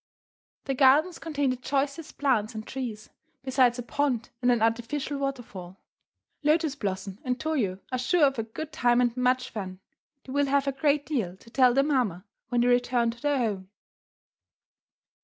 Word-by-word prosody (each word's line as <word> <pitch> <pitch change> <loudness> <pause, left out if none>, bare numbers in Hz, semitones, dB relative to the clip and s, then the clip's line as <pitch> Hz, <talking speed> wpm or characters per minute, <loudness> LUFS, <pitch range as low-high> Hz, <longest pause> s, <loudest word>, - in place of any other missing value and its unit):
The 270 - -1
gardens 290 +6 +4
contain 290 -4 -1
the - - -1
choicest 280 +4 -2
plants 235 -5 +1
and 215 0 -5
trees, 235 -5 -6 0.3
besides 260 -2 +3
a 245 - -4
pond 250 -1 -1
and 245 0 +4
an 235 -2 +2
artificial 240 +5 -1
waterfall. 225 -10 -5 0.6
Lotus 310 0 +2
Blossom 195 -4 -4
and 250 -1 -2
Toyo 255 -13 -1
are 255 - -1
sure 300 +5 +3
of 270 -3 0
a - - 0
good 295 +8 -7
time 245 -5 +3
and 240 -1 +2
much 255 0 +1
fun. 185 -3 -6 0.4
They 260 - -10
will 285 0 +2
have 280 0 +2
a 275 - +1
great 285 +1 +1
deal 210 - -2
to 230 - -18
tell 250 -1 +4
their 275 - +4
mamma 240 - 0 0.2
when 245 -1 +1
they 245 - +3
return 245 -1 +2
to 235 +1 -14
their 290 -1 +1
home. 205 -6 -2
255 Hz, 175 wpm, -27 LUFS, 230-280 Hz, 0.6 s, gardens